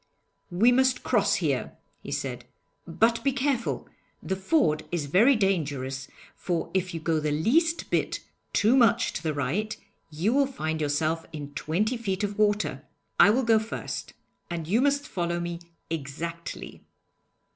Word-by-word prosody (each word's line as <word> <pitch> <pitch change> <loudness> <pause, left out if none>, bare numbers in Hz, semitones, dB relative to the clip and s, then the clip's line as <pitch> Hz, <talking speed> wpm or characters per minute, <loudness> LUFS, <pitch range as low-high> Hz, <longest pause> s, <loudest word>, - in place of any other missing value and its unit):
'We 205 +7 +4
must 260 +1 +3
cross - - +2
here,' - - -1 0.3
he - - -8
said. - - -3 0.4
'But 230 0 +2
be 275 - +3
careful. 265 -2 -1 0.4
The 190 - -1
ford 190 - +2
is 170 -4 -1
very 215 - +5
dangerous, 145 - -1 0.3
for 175 -2 -2
if 185 -2 -1
you - - -2
go 160 0 0
the 155 0 -1
least 315 - +1
bit - - 0 0.3
too 220 +5 +4
much 235 -5 +4
to - - -4
the 155 -3 -2
right, 200 +11 -1 0.3
you 165 +9 0
will 280 0 +3
find 160 - -3
yourself 155 +2 0
in 145 -2 -7
twenty 210 - -1
feet 200 -3 -2
of 205 0 -3
water. 210 0 +1 0.4
I - - +8
will 250 +5 +3
go 225 -2 +4
first, 220 +1 -5 0.4
and 170 -2 -4
you 220 +8 +3
must 285 +1 +1
follow 175 -1 -2
me 170 0 -4 0.3
exactly.' 165 +3 -5
190 Hz, 155 wpm, -27 LUFS, 160-230 Hz, 0.4 s, I